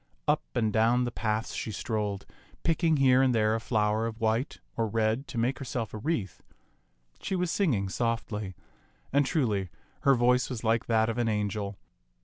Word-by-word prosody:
Up - - +3
and 110 -2 +1
down 115 +3 +3
the 120 - -2
paths 110 -1 -2
she 110 - -3
strolled, 105 -2 -2 0.4
picking 165 -1 +2
here 130 -1 +5
and 130 -2 +3
there 110 -1 +3
a 115 - 0
flower 110 -1 +1
of 115 0 -6
white 115 +5 0 0.2
or 115 -1 0
red 110 +5 0
to 125 - -7
make 125 +5 0
herself 125 -5 -4
a 110 - -5
wreath. 115 - -2 0.8
She 190 - -2
was 180 -2 0
singing 125 - +1
softly; 105 -3 -2 0.6
and, 140 -1 +3
truly, 105 - 0 0.3
her 135 -1 +4
voice 125 +1 +3
was 120 -3 -5
like 115 0 +1
that 110 -1 +3
of 115 +1 -2
an 120 - +1
angel. 105 -1 -2
115 Hz, 175 wpm, -29 LUFS, 110-125 Hz, 0.8 s, here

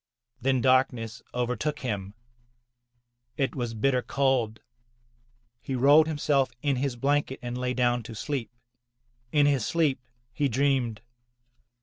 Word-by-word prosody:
Then 130 0 +2
darkness 125 -3 +2
overtook 125 +4 -2
him. 105 -5 -4 1.2
It 135 - 0
was 120 -4 -3
bitter 125 +3 +2
cold. 125 -5 0 1.0
He 135 - -4
rolled 145 +5 +6
himself 145 -3 +1
in 140 -3 +1
his 135 -1 -1
blanket 140 +1 0
and 120 0 -4
lay 125 0 -2
down 120 -1 +2
to 115 - -7
sleep. 125 -1 -3 0.8
In 145 -1 +4
his 140 -5 +2
sleep 155 0 +1 0.3
he 140 +2 0
dreamed. 130 -3 0
130 Hz, 120 wpm, -27 LUFS, 120-140 Hz, 1.2 s, rolled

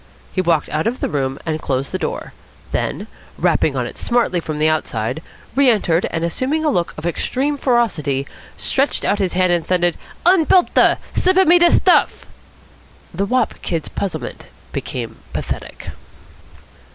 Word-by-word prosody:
He 185 - +1
walked 165 -4 +1
out 155 +6 -1
of 245 +3 -2
the - - -1
room 135 -2 -1
and 155 -1 -2
closed 135 0 -2
the 185 - -2
door; - - -4 0.4
then, - - -2 0.3
rapping - - +2
on - - -1
it - - -8
smartly 235 -7 +1
from 155 -2 -4
the 155 +1 +2
outside, 155 -3 -1 0.3
re 275 -1 +5
entered 185 -7 +2
and, 165 0 -2
assuming 265 - -1
a 300 - +3
look 175 -8 -1
of 155 - -7
extreme 265 - -1
ferocity, 205 - +1 0.3
stretched 275 +2 0
out 205 - +1
his 190 -3 0
hand 185 -1 +3
and 170 -1 +1
thundered: 175 -2 +1 0.3
"Unbelt 360 0 +4
a! - - +5 0.2
Slip 370 +1 +2
a 380 - +6
me 350 +2 +6
da 345 0 +6
stuff!" - - +3 0.9
The 195 +4 -1
wop 250 -1 +1
kid's 165 -3 -3
puzzlement 195 -3 -5 0.3
became 115 -3 -5 0.2
pathetic. - - -5
180 Hz, 165 wpm, -19 LUFS, 155-255 Hz, 0.9 s, a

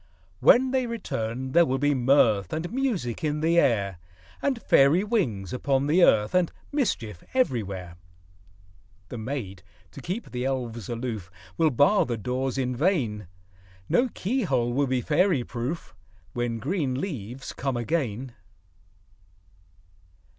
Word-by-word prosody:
When 255 +1 +5
they 260 -2 +1
return, 130 - -4
there 170 +4 +6
will 135 -5 0
be 145 +2 +2
mirth 120 -7 +3
And 170 +6 -3
music 220 - -1
in 150 0 -1
the 165 +2 +4
air, 100 - +1 0.4
And 270 -4 0
fairy 150 0 +4
wings 130 - -1
upon 135 +1 0
the 165 +5 +4
earth, 105 -6 +4
And 180 -2 +2 0.2
mischief 115 - -2
everywhere. 100 - -1 1.1
The 120 - -6
maids, 110 -6 -5 0.3
to - - -10
keep 195 +6 -5
the 125 0 -3
elves 120 -5 -3
aloof, 115 -6 -4 0.3
Will 160 - +3
bar 145 - +3
the 120 -2 -2
doors 125 +4 -2
in 125 -1 -1
vain; 120 - 0 0.6
No 250 +2 +3
key 240 +6 -2
hole 125 - 0
will 140 +2 +1
be 130 -1 0
fairy 155 0 +2
proof, 120 - -5 0.4
When 120 -1 -2
green 135 - -1
leaves 135 - -5
come 135 -2 -2
again. 125 -2 -2
130 Hz, 135 wpm, -26 LUFS, 115-170 Hz, 1.1 s, there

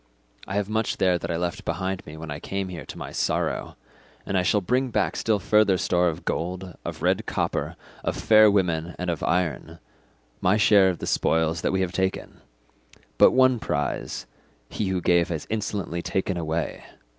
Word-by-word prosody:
I 95 - -4
have 100 -1 0
much 110 0 -1
there 90 -2 +2
that - - -5
I 85 - -1
left 85 0 -3
behind 95 0 -3
me 75 +1 -9
when 80 -1 -7
I 75 - -5
came 95 +2 -4
here 90 -2 -7
to - - -8
my - - -7
sorrow, - - -1 0.5
and 100 - -3
I 95 - +4
shall 105 +3 +2
bring 125 +7 0
back 105 -4 0
still 110 -2 +1
further 105 -1 +3
store 90 0 +2
of 80 - -7
gold, 90 +1 -3
of - - -6
red - - +1
copper, - - -2 0.3
of - - -2
fair 110 -1 +6
women, 85 -4 0
and 90 -1 -2
of 80 - -4
iron, 85 -2 -1 0.6
my 95 +3 +3
share 100 -3 +5
of 90 - -2
the - - -6
spoils 80 0 +1
that - - 0
we 95 0 +1
have 90 -2 -1
taken; 95 +1 -3 0.8
but - - +9
one 130 -2 +4
prize, 75 -8 -3 0.4
he 105 - -2
who 95 -1 -1
gave 85 -1 +3
has 80 -3 -3
insolently 100 -5 -2
taken 95 +2 -1
away. 80 -1 -3
90 Hz, 190 wpm, -25 LUFS, 85-100 Hz, 0.8 s, but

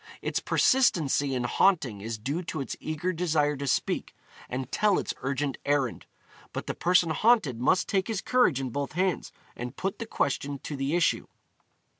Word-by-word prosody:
Its - - 0
persistency 150 - +2
in 125 - -1
haunting 125 - +2
is 115 +2 -4
due 140 +10 -3
to 165 -2 -5
its 135 - -4
eager 155 +4 -2
desire 155 -4 +1
to 140 0 -4
speak, - - -1 0.3
and 130 +1 -4
tell 210 -3 +3
its - - -2
urgent 135 +1 -2
errand, 140 -4 0 0.5
but - - -4
the - - -2
person 175 -2 +3
haunted 190 - +3
must 180 - +3
take 190 -1 0
his 220 -4 -1
courage 245 - +3
in 130 -2 -3
both 140 +4 -3
hands 185 +1 0 0.2
and 120 +2 -6
put 195 +1 -3
the 230 - -5
question 140 -5 -1
to 145 +3 -6
the 135 +3 -1
issue. 175 -1 +1
145 Hz, 175 wpm, -28 LUFS, 135-180 Hz, 0.5 s, tell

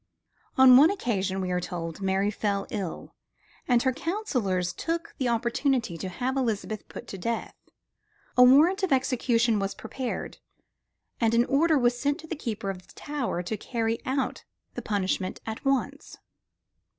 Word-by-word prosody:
On 260 -1 +9
one 300 +5 +7
occasion, 200 - -1
we 185 -1 -2
are 180 - +1
told, 170 0 -5
Mary 195 +1 +1
fell 200 -1 -1
ill; 195 -6 -5 0.5
and 245 -2 +3
her 260 -1 +2
counselors 245 - -1
took 335 - -3
the 260 - +1
opportunity 235 - 0
to 185 +3 -5
have 250 +8 -2
Elizabeth 220 -4 -2
put - - -9
to 195 - -7
death. 230 +5 -3 0.8
A 250 - +5
warrant 295 +10 +7
for 380 - +1
her 270 - +5
execution 240 -3 +1
was 195 0 -2
prepared, 250 +3 -5 0.8
and 230 -1 +2
an 235 +1 +4
order 310 +4 +3
was 245 -1 +2
sent 285 +5 0
to - - -11
the 330 - -4
keeper 215 -8 -3
of 180 -1 -11
the - - -17
Tower 275 - -3
to 200 +5 -3
carry 225 +1 -2
out 260 0 -2 0.3
the - - -5
punishment 190 -2 -1
at 220 0 -6
once. 275 -2 -1
235 Hz, 165 wpm, -27 LUFS, 195-270 Hz, 0.8 s, On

